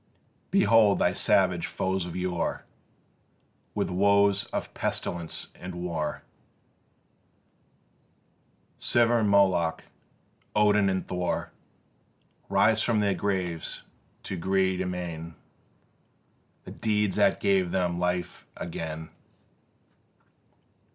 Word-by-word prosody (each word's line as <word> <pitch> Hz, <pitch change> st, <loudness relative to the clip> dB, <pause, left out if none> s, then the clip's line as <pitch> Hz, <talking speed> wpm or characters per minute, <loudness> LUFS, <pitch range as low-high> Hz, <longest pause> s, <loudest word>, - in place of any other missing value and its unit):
Behold 115 Hz, -, +5 dB
thy -, -, +2 dB
savage -, -, +2 dB
foes 95 Hz, -1 st, -2 dB
of 85 Hz, -, -7 dB
yore 90 Hz, -1 st, -2 dB, 1.1 s
With -, -, -1 dB
woes 100 Hz, +1 st, +3 dB
of -, -, -5 dB
pestilence 85 Hz, -2 st, -3 dB
and 90 Hz, 0 st, -8 dB
war, 85 Hz, -4 st, -3 dB, 2.6 s
Siva 120 Hz, 0 st, +3 dB
and 105 Hz, -2 st, +1 dB
Moloch, 95 Hz, -5 st, +3 dB, 0.7 s
Odin 105 Hz, -1 st, +4 dB
and 95 Hz, -1 st, -2 dB
Thor, 90 Hz, -1 st, -2 dB, 1.0 s
Rise 110 Hz, +1 st, +3 dB
from 115 Hz, -2 st, +1 dB
their 100 Hz, -1 st, +2 dB
graves 90 Hz, -5 st, -2 dB, 0.4 s
to -, -, -4 dB
greet 95 Hz, +1 st, +1 dB
amain 85 Hz, -3 st, -5 dB, 1.3 s
The -, -, -10 dB
deeds 105 Hz, -3 st, 0 dB
that -, -, +3 dB
give 95 Hz, -2 st, +2 dB
them 90 Hz, -1 st, 0 dB
life 90 Hz, -1 st, -2 dB
again. 80 Hz, -2 st, -6 dB
95 Hz, 90 wpm, -27 LUFS, 85-100 Hz, 2.6 s, Behold